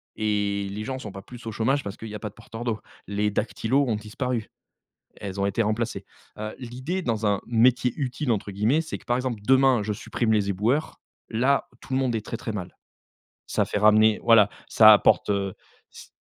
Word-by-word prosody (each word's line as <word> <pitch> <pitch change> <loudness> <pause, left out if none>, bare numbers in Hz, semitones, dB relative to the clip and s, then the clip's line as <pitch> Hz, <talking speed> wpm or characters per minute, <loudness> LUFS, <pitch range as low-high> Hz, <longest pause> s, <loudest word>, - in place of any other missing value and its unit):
et 105 -2 -1
les 105 +2 -5
gens 130 +1 -4
sont 105 -5 -7
pas 95 - -9
plus 120 0 -12
au - - -3
chômage 130 +7 0
parce 100 +1 -6
qu'il 115 - -8
y 105 - -7
a - - -5
pas 105 - -5
de 100 - -22
porteurs 115 +1 -9
d'eau. 115 -3 -2 0.3
Les 105 +1 0
dactylo 115 +6 0
ont 110 - +1
disparu, 110 +2 -3 0.7
elles 100 -1 -6
ont 100 - +2
été 115 +4 0
remplacées. 110 +2 -2 0.3
Heu, 110 0 -5
l'idée 130 +9 -4
dans 110 -4 -1
un 100 -1 +1
métier 120 +1 +3
«utile» 135 -1 -2
entre 105 -2 -1
guillemets, 110 +11 +2
c'est 160 - -6
que - - -21
par 120 - +1
exemple 125 -4 -3
demain 130 -3 +4
je 105 +1 -2
supprime 110 +2 -1
les 100 -2 +2
éboueurs, 115 +11 -1 0.3
là 130 +5 +2
tout 135 - -11
le - - +2
monde 130 -3 0
est 110 -1 -2
très, 115 - -4
très 110 -1 -5
mal. 90 -3 -6 0.7
Ça - - +1
fait - - -2
ramener 110 +1 +5
voilà, 115 -3 +6 0.2
ça 110 -1 +8
apporte, 105 - +4
heu, 100 -1 -1 0.4
s - - -12
110 Hz, 210 wpm, -25 LUFS, 105-125 Hz, 0.7 s, ça